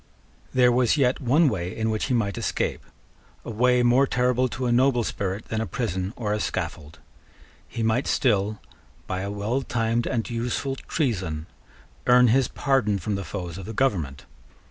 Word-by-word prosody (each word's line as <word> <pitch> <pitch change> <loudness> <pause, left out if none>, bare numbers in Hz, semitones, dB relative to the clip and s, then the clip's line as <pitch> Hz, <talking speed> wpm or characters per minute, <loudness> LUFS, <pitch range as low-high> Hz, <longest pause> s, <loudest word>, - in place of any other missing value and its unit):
There 125 -1 +4
was 125 +3 +3
yet 130 -1 +2
one 145 +6 +4
way 90 -8 -2
in 110 0 0
which 110 - -1
he 130 - 0
might 100 -5 0
escape, - - -2 0.6
a - - -5
way 125 +2 +3
more 125 +3 +4
terrible 125 0 +1
to 130 +2 -4
a 120 - +1
noble 125 0 +3
spirit 100 -1 -3
than 110 0 -1
a 110 - -3
prison 95 -6 -2
or 105 -3 -2
a 105 - -1
scaffold. 75 -6 -4 0.7
He 115 0 -4
might 115 +4 +1
still, 105 -4 +1 0.5
by 95 0 -3
a 100 - -3
well 105 +6 -1
timed 115 -2 -1
and 115 -4 -1
useful 120 +3 -2
treason, 95 - -2 0.6
earn 125 0 +6
his 130 +2 +3
pardon 135 -8 +1
from 100 +3 -3
the 100 0 -2
foes 90 0 -6
of 95 - -7
the 110 - -5
government. 85 - -1
115 Hz, 175 wpm, -25 LUFS, 100-125 Hz, 0.7 s, earn